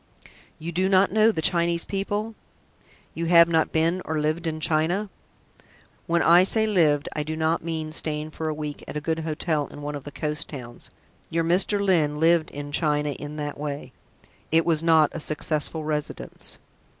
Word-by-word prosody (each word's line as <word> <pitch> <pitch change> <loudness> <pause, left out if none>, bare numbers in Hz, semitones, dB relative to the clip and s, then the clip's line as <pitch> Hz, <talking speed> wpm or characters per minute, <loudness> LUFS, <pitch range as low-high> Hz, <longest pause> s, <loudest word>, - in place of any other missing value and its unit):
"You 165 +2 -6
do 185 +3 0
not 195 0 +4
know 220 +2 +4
the 160 -7 -4
Chinese 170 0 +2
people? 205 +3 -3 0.8
You 165 0 -3
have 170 -1 +7
not 160 -1 +1
been 165 +3 +1
or 160 - -3
lived 155 +3 -1
in 155 -1 -3
China? 170 +6 0 1.0
When 170 0 +2
I 175 +2 +7
say 220 +3 +2
lived 160 -8 +2
I 155 - -1
do 155 +1 -4
not 160 +1 0
mean 160 -2 -4
staying 155 0 +1
for 160 0 -4
a - - -1
week 150 -1 -6
at - - -5
a - - -1
good 160 +2 -2
hotel 155 -1 -1
in 145 - -11
one 145 0 -4
of 145 -2 -6
the 145 - -8
coast 150 +2 -2
towns. 125 -5 -10 0.4
Your 165 0 0
Mr. 185 +5 +2
Lyne 150 -5 +2
lived 165 0 +3
in 145 0 -7
China 150 -1 +1
in 145 +1 -7
that 145 -1 -5
way. 145 -3 -5 0.6
It 165 +1 +4
was 160 -2 +2
not 160 -2 +4
a 165 - -4
successful 155 +1 -2
residence." 150 -1 -4
160 Hz, 185 wpm, -25 LUFS, 150-170 Hz, 1.0 s, have